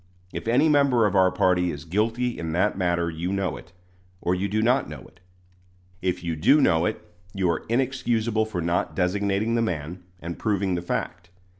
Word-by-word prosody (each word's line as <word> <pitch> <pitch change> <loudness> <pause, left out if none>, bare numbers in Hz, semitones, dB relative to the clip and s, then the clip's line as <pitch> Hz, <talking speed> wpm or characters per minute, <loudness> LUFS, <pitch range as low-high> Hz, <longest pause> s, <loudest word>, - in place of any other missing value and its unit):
If - - -6
any 130 +7 +4
member 140 -6 +4
of 100 -1 0
our 95 -1 +5
party 90 -1 +2
is 75 -1 -6
guilty 115 +7 0
in 80 -1 -3
that 95 +5 +1
matter 85 -2 0
you 85 +3 -3
know 95 -4 -1
it, 80 - -12 0.5
or 90 - 0
you 95 +2 -1
do 110 +2 0
not 125 +4 +2
know - - -8
it. - - -18 0.8
If 90 -1 -1
you 85 -1 -2
do 135 - +4
know 85 - +3
it, - - -3 0.4
you 95 -2 +1
are 80 - -3
inexcusable 115 -3 0
for 100 -5 -4
not 85 +1 -1
designating 100 +4 0
the 115 - +2
man 90 -4 -3 0.2
and 85 0 -7
proving 100 -3 0
the 85 - -1
fact. 90 0 -4
95 Hz, 190 wpm, -25 LUFS, 85-115 Hz, 0.8 s, our